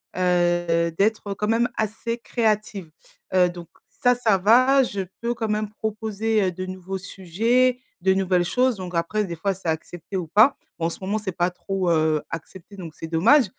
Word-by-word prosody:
heu, 175 Hz, -2 st, +2 dB
d'être 205 Hz, -1 st, +1 dB
quand 210 Hz, +2 st, -3 dB
même 235 Hz, +2 st, +3 dB
assez 220 Hz, +2 st, -2 dB
créative. 215 Hz, -7 st, -1 dB, 0.4 s
Heu, 180 Hz, -1 st, +4 dB
donc 175 Hz, -1 st, -9 dB, 0.2 s
ça, 245 Hz, -1 st, +2 dB
ça 220 Hz, -5 st, +2 dB
va, 255 Hz, +7 st, +5 dB
je 205 Hz, -5 st, -3 dB, 0.2 s
peux 235 Hz, +1 st, 0 dB
quand 230 Hz, -2 st, -3 dB
même 210 Hz, 0 st, -1 dB
proposer, 220 Hz, 0 st, -1 dB
heu, 185 Hz, -, +1 dB
de 185 Hz, +2 st, -5 dB
nouveaux 185 Hz, +1 st, -5 dB
sujets, 225 Hz, +7 st, +1 dB, 0.2 s
de 190 Hz, +1 st, +3 dB
nouvelles 185 Hz, -2 st, +1 dB
choses, 250 Hz, +5 st, +2 dB
donc 180 Hz, -2 st, -6 dB
après 190 Hz, +6 st, 0 dB
des 170 Hz, -3 st, -5 dB
fois 195 Hz, +5 st, -1 dB
c'est 185 Hz, -2 st, -9 dB
accepté 165 Hz, +3 st, -5 dB
ou 170 Hz, -3 st, -3 dB
pas. 215 Hz, -, +5 dB, 0.2 s
Bon 165 Hz, -, +1 dB
en -, -, -1 dB
ce -, -, -8 dB
moment 200 Hz, +3 st, -1 dB
c'est 205 Hz, -3 st, -4 dB
pas 175 Hz, 0 st, 0 dB
trop, 190 Hz, 0 st, -2 dB
heu, 155 Hz, -2 st, +2 dB
accepté 180 Hz, +4 st, -9 dB
donc 165 Hz, -4 st, -8 dB
c'est 165 Hz, -, -7 dB
dommage, 225 Hz, -, +5 dB
195 Hz, 190 wpm, -23 LUFS, 175-220 Hz, 0.4 s, va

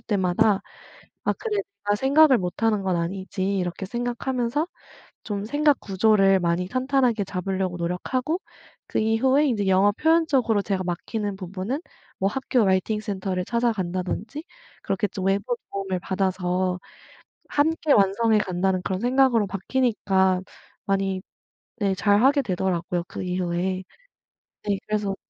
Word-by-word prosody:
때마다 195 Hz, 0 st, +2 dB, 0.6 s
'아 -, -, +1 dB
그래 430 Hz, -3 st, -3 dB, 0.3 s
내가 205 Hz, 0 st, +2 dB
생각을 275 Hz, +2 st, +5 dB
못하는 210 Hz, +4 st, 0 dB
건 185 Hz, -2 st, +1 dB
아니지.' 190 Hz, +2 st, -2 dB
이렇게 180 Hz, +1 st, -3 dB
생각하면서 245 Hz, -, -2 dB, 0.6 s
좀 205 Hz, -1 st, -3 dB
생각 290 Hz, +3 st, +2 dB
구조를 195 Hz, -1 st, +3 dB
많이 175 Hz, +1 st, 0 dB
탄탄하게 255 Hz, -2 st, +1 dB
잡을려고 185 Hz, -1 st, -2 dB
노력하고 250 Hz, -, -2 dB, 0.5 s
그 -, -, -3 dB
이후에 260 Hz, +7 st, +3 dB
인제 215 Hz, -7 st, 0 dB
영어 190 Hz, +2 st, +4 dB
표현적으로 275 Hz, -6 st, +2 dB
제가 195 Hz, -2 st, -1 dB
막히는 200 Hz, +3 st, -3 dB
부분은 190 Hz, -, -4 dB, 0.4 s
뭐 190 Hz, -, +1 dB
학교 250 Hz, -1 st, +1 dB
라이팅 190 Hz, +3 st, +1 dB
센터를 190 Hz, -3 st, -3 dB
찾아간다든지 220 Hz, -, -2 dB, 0.4 s
그렇게 195 Hz, +2 st, -1 dB
좀 190 Hz, -1 st, -5 dB
외부 200 Hz, +5 st, +1 dB, 0.2 s
도움을 195 Hz, -2 st, -2 dB
받아서 185 Hz, -1 st, -1 dB, 0.7 s
함께 310 Hz, +1 st, +1 dB
완성해 210 Hz, +2 st, +3 dB
간다는 185 Hz, -1 st, 0 dB
그런 190 Hz, -1 st, -2 dB
생각으로 245 Hz, -3 st, +3 dB
바뀌니까 195 Hz, -3 st, +1 dB, 0.4 s
많이 195 Hz, -1 st, 0 dB, 0.6 s
네 200 Hz, -3 st, +1 dB
잘하게 235 Hz, +9 st, +4 dB
되더라고요 180 Hz, -3 st, -1 dB
그 -, -, -6 dB
이후에. 180 Hz, +1 st, -1 dB, 0.8 s
네 200 Hz, -2 st, -1 dB
그래서 210 Hz, -2 st, -1 dB
200 Hz, 310 characters per minute, -24 LUFS, 185-240 Hz, 0.8 s, 생각을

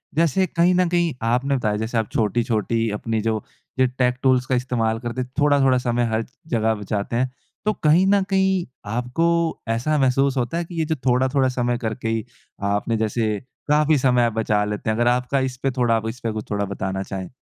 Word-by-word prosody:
जैसे 165 Hz, +4 st, +3 dB
कहीं 170 Hz, +3 st, +2 dB
न 180 Hz, -1 st, +3 dB
कहीं 170 Hz, -2 st, +1 dB
आपने 130 Hz, +4 st, +1 dB
बताया 110 Hz, -5 st, 0 dB
जैसे 110 Hz, +2 st, -2 dB
आप 110 Hz, -, 0 dB
छोटी-छोटी 115 Hz, 0 st, 0 dB
अपनी 110 Hz, +1 st, -2 dB
जो, 110 Hz, -1 st, -1 dB, 0.4 s
जो 130 Hz, -, +6 dB
टेक 125 Hz, -1 st, +2 dB
टूल्स 130 Hz, -1 st, +3 dB
का 130 Hz, -, 0 dB
इस्तेमाल 115 Hz, -3 st, 0 dB
करते 120 Hz, +1 st, -4 dB
हैं 125 Hz, -, -5 dB
थोड़ा-थोड़ा 140 Hz, -3 st, +4 dB
समय 120 Hz, -1 st, 0 dB
हर 110 Hz, +1 st, 0 dB, 0.3 s
जगह 110 Hz, 0 st, +2 dB
बचाते 105 Hz, +1 st, -3 dB
हैं। 125 Hz, +1 st, 0 dB, 0.3 s
तो 215 Hz, -, +2 dB
कहीं 160 Hz, +5 st, +5 dB
न 200 Hz, 0 st, +4 dB
कहीं 190 Hz, -2 st, +2 dB, 0.3 s
आपको 125 Hz, +7 st, 0 dB, 0.4 s
ऐसा 125 Hz, +7 st, +1 dB
महसूस 135 Hz, 0 st, +2 dB
होता 125 Hz, +6 st, -1 dB
है 170 Hz, -, -2 dB
कि 175 Hz, -, -10 dB
ये 160 Hz, -, +1 dB
जो 160 Hz, 0 st, -1 dB
थोड़ा-थोड़ा 130 Hz, +1 st, +2 dB
समय 120 Hz, -1 st, 0 dB
करके 115 Hz, 0 st, -4 dB
ही 115 Hz, -1 st, -1 dB, 0.5 s
आपने 110 Hz, +2 st, 0 dB
जैसे 110 Hz, -1 st, 0 dB, 0.3 s
काफ़ी 150 Hz, 0 st, +4 dB
समय 125 Hz, -2 st, +3 dB
आप 115 Hz, -, -1 dB
बचा 105 Hz, -2 st, +1 dB
लेते 105 Hz, +2 st, -3 dB
हैं। 110 Hz, -, +1 dB
अगर 120 Hz, -, +2 dB
आपका 125 Hz, +3 st, +1 dB
इसपे 130 Hz, +1 st, -3 dB
थोड़ा 115 Hz, -2 st, +2 dB
इसपे 115 Hz, -1 st, -4 dB
कुछ 110 Hz, 0 st, -6 dB
थोड़ा 100 Hz, 0 st, 0 dB
बताना 95 Hz, -1 st, -3 dB
चाहें? 95 Hz, -1 st, -6 dB
125 Hz, 195 wpm, -22 LUFS, 110-140 Hz, 0.5 s, जो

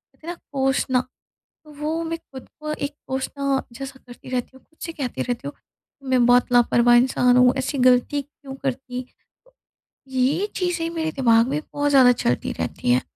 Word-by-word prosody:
इतना 335 Hz, +2 st, -7 dB, 0.2 s
कोसना, 265 Hz, -2 st, +1 dB, 0.6 s
तो 300 Hz, -, -14 dB
वो 320 Hz, +2 st, -1 dB
मैं 330 Hz, 0 st, -3 dB
ख़ुद 265 Hz, -5 st, -13 dB
को 305 Hz, 0 st, -4 dB
एक 290 Hz, -1 st, -4 dB
कोसना 270 Hz, +1 st, -1 dB
जैसा 270 Hz, +1 st, -8 dB
करती 245 Hz, +1 st, -12 dB
रहती 250 Hz, -2 st, -2 dB
हूँ, 265 Hz, -, -16 dB
ख़ुद 315 Hz, -, -35 dB
से 330 Hz, -, -5 dB
कहती 270 Hz, -6 st, -4 dB
रहती 245 Hz, +3 st, -3 dB
हूँ। 285 Hz, -, -6 dB, 0.6 s
मैं 250 Hz, -2 st, +4 dB
बहुत 245 Hz, 0 st, +4 dB
लापरवाह 240 Hz, 0 st, +5 dB
इंसान 250 Hz, 0 st, +4 dB
हूँ, 250 Hz, +1 st, +6 dB
ऐसी 265 Hz, +2 st, -2 dB
गलती 255 Hz, +3 st, +3 dB
क्यों 280 Hz, -1 st, -12 dB
करती, 260 Hz, -2 st, -4 dB, 1.0 s
ये 265 Hz, +9 st, +1 dB
चीज़ें 355 Hz, -3 st, -1 dB
मेरे 320 Hz, -1 st, -2 dB
दिमाग 235 Hz, -3 st, +3 dB
में 290 Hz, +2 st, -1 dB
बहुत 290 Hz, 0 st, +1 dB
ज़्यादा 255 Hz, -3 st, +7 dB
चलती 125 Hz, -, -1 dB
रहती 125 Hz, -, -2 dB
हैं 125 Hz, +1 st, +4 dB
265 Hz, 170 wpm, -23 LUFS, 250-290 Hz, 1.0 s, ज़्यादा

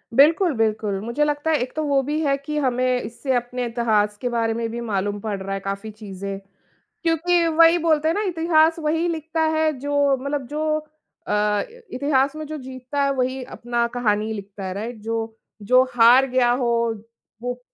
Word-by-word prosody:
बिल्कुल, 320 Hz, +5 st, +5 dB
बिल्कुल, 215 Hz, -3 st, 0 dB
मुझे 235 Hz, +7 st, -1 dB
लगता 295 Hz, +1 st, 0 dB
है 310 Hz, -, +3 dB
एक 250 Hz, -, -4 dB
तो 310 Hz, -, -1 dB
वो 280 Hz, -2 st, +2 dB
भी 295 Hz, +3 st, -2 dB
है 280 Hz, -2 st, +2 dB
कि 300 Hz, +2 st, -5 dB
हमें 255 Hz, -1 st, +1 dB
इससे 240 Hz, +4 st, -3 dB
अपने 245 Hz, +1 st, -2 dB
इतिहास 220 Hz, -3 st, +1 dB
के 245 Hz, -, -1 dB
बारे 230 Hz, -1 st, 0 dB
में 230 Hz, 0 st, -2 dB
भी 235 Hz, 0 st, -4 dB
मालूम 205 Hz, -2 st, -2 dB
पड़ 205 Hz, -1 st, -3 dB
रहा 195 Hz, +1 st, -4 dB
है 195 Hz, -, -2 dB
काफ़ी 200 Hz, +2 st, -5 dB
चीज़ें, 200 Hz, -2 st, -7 dB, 0.6 s
क्योंकि 335 Hz, +1 st, +2 dB
वही 330 Hz, +1 st, +5 dB
बोलते 315 Hz, -2 st, +2 dB
हैं 330 Hz, -, +1 dB
ना, 420 Hz, -, 0 dB
इतिहास 325 Hz, -1 st, +3 dB
वही 320 Hz, +2 st, 0 dB
लिखता 320 Hz, 0 st, -3 dB, 0.2 s
है 315 Hz, 0 st, +2 dB
जो 285 Hz, 0 st, +2 dB
मतलब 280 Hz, 0 st, -3 dB
जो 305 Hz, +2 st, -1 dB, 0.5 s
अ, 210 Hz, 0 st, +1 dB, 0.3 s
इतिहास 275 Hz, +1 st, +1 dB
में 310 Hz, -, -5 dB
जो 310 Hz, +1 st, -5 dB
जीतता 260 Hz, +2 st, -4 dB
है 275 Hz, -, +2 dB
वही 260 Hz, 0 st, -1 dB
अपना 235 Hz, 0 st, -1 dB
कहानी 215 Hz, -2 st, 0 dB
लिखता 200 Hz, -1 st, -7 dB
है, 185 Hz, 0 st, -4 dB
राइट? 225 Hz, +4 st, -5 dB
जो 225 Hz, 0 st, -3 dB, 0.3 s
जो 255 Hz, +5 st, +5 dB
हार 245 Hz, +3 st, +7 dB
गया 250 Hz, -1 st, +3 dB
हो, 245 Hz, -1 st, +1 dB, 0.7 s
वो, 245 Hz, 0 st, -4 dB
255 Hz, 185 wpm, -22 LUFS, 225-300 Hz, 0.7 s, हार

